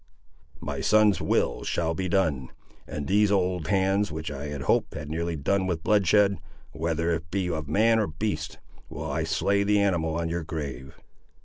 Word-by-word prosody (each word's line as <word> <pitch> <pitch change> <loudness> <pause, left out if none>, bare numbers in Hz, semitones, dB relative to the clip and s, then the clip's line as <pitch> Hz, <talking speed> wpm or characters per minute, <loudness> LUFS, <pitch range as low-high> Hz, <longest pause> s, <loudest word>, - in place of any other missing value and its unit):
"My - - -4
son's 105 -2 +4
will - - 0
shall 80 -1 -1
be 90 +2 -3
done. 80 -9 0 0.4
And 75 - -5
with - - -7
these 105 +1 +4
old 90 -4 0
hands, 95 0 +1
which 80 0 -5
I 70 +1 -5
had 70 -2 -5
hoped - - +1
had 75 0 -6
nearly 85 +1 -2
done 95 +6 0
with 85 -3 -2
bloodshed, 100 -2 +3 0.3
whether 85 +1 -1
it 80 -1 -4
be 90 0 -1
of 80 -3 -4
man 110 +8 +3
or 105 - +1
beast, 80 -1 -3 0.3
will - - -5
I - - -1
slay 100 0 +1
the 105 +1 +3
animal 85 -5 +1
on 85 0 -1
your 85 0 -2
grave!" 70 -5 -6
85 Hz, 185 wpm, -26 LUFS, 80-100 Hz, 0.4 s, son's